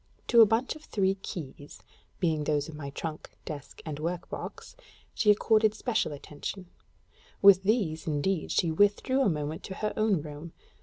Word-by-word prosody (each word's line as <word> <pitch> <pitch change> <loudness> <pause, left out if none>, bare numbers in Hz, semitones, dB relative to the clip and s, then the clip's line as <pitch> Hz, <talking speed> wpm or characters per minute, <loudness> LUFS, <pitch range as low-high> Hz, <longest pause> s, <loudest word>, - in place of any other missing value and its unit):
To 235 -1 +7
a 220 - +8
bunch 225 +7 0
of 310 - -13
three 195 -7 +1
keys, 150 -7 -8 0.4
being 160 -4 +1
those 150 -1 0
of 160 - -9
my 145 -2 -6
trunk, 155 +2 -6 0.2
desk, 145 -2 -8
and 150 -2 -5
work 175 +3 -4
box, - - -7 0.4
she 210 - +1
accorded 215 +1 +4
special 225 -7 -1
attention: 150 +6 -7 0.7
with 195 -2 +8
these, 190 -7 0
indeed, 155 +3 -1
she 170 - +2
withdrew 205 +9 +2
a 260 - +4
moment 150 -1 -3
to 190 - -6
her 210 +1 -2
own 210 -8 +1
room. 150 +2 -9
175 Hz, 165 wpm, -29 LUFS, 150-210 Hz, 0.7 s, a